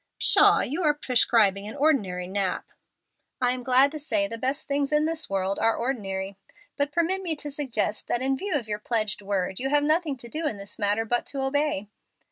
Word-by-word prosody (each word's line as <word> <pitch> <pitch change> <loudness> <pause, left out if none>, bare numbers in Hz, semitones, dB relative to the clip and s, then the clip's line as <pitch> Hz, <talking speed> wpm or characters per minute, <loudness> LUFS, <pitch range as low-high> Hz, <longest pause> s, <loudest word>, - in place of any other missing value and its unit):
"Pshaw! - - +5
you 305 +8 -2
are 300 -3 +3
prescribing 225 -7 +2
an 215 - -7
ordinary 205 - +1
nap." 190 0 -2 0.7
"I 245 -1 +2
am 255 0 -3
glad 260 +3 +5
to 310 - -6
say 215 -9 0
the 230 - -5
best 265 +4 -2
things 280 0 0
in 300 0 +3
this 320 -1 -2
world 195 0 -1
are 225 0 +2
ordinary. 195 -6 -3 0.4
But 285 0 0
permit 345 +4 +1
me 340 -4 -2
to 295 0 -7
suggest 235 -7 -2
that 240 - 0
in 270 0 +2
view 375 +5 -2
of 245 -6 -1
your 210 -1 -3
pledged 215 -2 -1
word 190 -2 -2
you 270 +2 -1
have 290 0 +3
nothing 305 -2 +1
to 240 - -9
do 310 +6 -3
in 245 - -3
this 200 +2 -7
matter 205 +2 +1
but 240 +2 -1
to 275 -2 -2
obey." 275 -6 0
250 Hz, 210 wpm, -26 LUFS, 205-290 Hz, 0.7 s, Pshaw